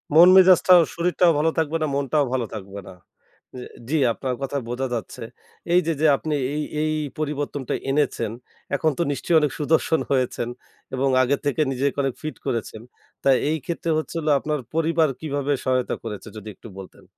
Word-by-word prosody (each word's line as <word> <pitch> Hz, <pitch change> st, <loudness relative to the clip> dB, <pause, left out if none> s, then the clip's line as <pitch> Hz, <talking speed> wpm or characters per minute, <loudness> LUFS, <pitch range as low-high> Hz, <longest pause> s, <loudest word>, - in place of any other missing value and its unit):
মন-মেজাজটা, 185 Hz, +2 st, +7 dB, 0.2 s
শরীরটাও 175 Hz, 0 st, +2 dB
ভালো 155 Hz, +2 st, +2 dB
থাকবে 160 Hz, 0 st, 0 dB
না, -, -, +1 dB
মনটাও 140 Hz, +1 st, +1 dB
ভালো 125 Hz, -2 st, 0 dB
থাকবে 100 Hz, -2 st, -7 dB
না। -, -, -10 dB, 0.6 s
অ্যা 125 Hz, -1 st, -8 dB, 0.2 s
জি 160 Hz, -, +1 dB, 0.2 s
আপনার 130 Hz, 0 st, -3 dB
কথায় 135 Hz, 0 st, -3 dB
বোঝা 130 Hz, +2 st, -2 dB
যাচ্ছে। 115 Hz, -5 st, -5 dB, 0.5 s
এইযে 170 Hz, -2 st, +3 dB
যে -, -, +3 dB
আপনি 155 Hz, +2 st, -3 dB, 0.2 s
এই, 150 Hz, 0 st, -1 dB, 0.2 s
এই 155 Hz, 0 st, 0 dB, 0.3 s
পরিবর্তনটা 145 Hz, -3 st, -3 dB, 0.2 s
এনেছেন 135 Hz, -6 st, 0 dB, 0.4 s
এখন 155 Hz, +2 st, +1 dB
তো 170 Hz, -, +1 dB
নিশ্চয়ই 160 Hz, +4 st, +1 dB
অনেক 150 Hz, -3 st, 0 dB
সুদর্শন 160 Hz, +2 st, +2 dB
হয়েছেন 125 Hz, -3 st, 0 dB, 0.5 s
এবং 135 Hz, +1 st, +1 dB
আগের 135 Hz, +2 st, +1 dB
থেকে 145 Hz, +2 st, 0 dB
নিজেকে 135 Hz, +2 st, -1 dB
অনেক 135 Hz, -2 st, -1 dB
ফিট 155 Hz, -, -5 dB
করেছেন। 110 Hz, -2 st, -3 dB, 0.4 s
তা -, -, +3 dB, 0.2 s
এইক্ষেত্রে 160 Hz, +2 st, -3 dB
হচ্ছে 155 Hz, -, -4 dB
হলো 155 Hz, -1 st, 0 dB
আপনার 150 Hz, +1 st, -2 dB
পরিবার 165 Hz, -1 st, +2 dB
কীভাবে 145 Hz, -2 st, -2 dB
সহায়তা 130 Hz, -1 st, 0 dB
করেছে? 105 Hz, -3 st, -7 dB
যদি 110 Hz, 0 st, -8 dB
একটু -, -, -13 dB
বলতেন। 95 Hz, -, -12 dB
145 Hz, 165 wpm, -23 LUFS, 130-160 Hz, 0.6 s, মন-মেজাজটা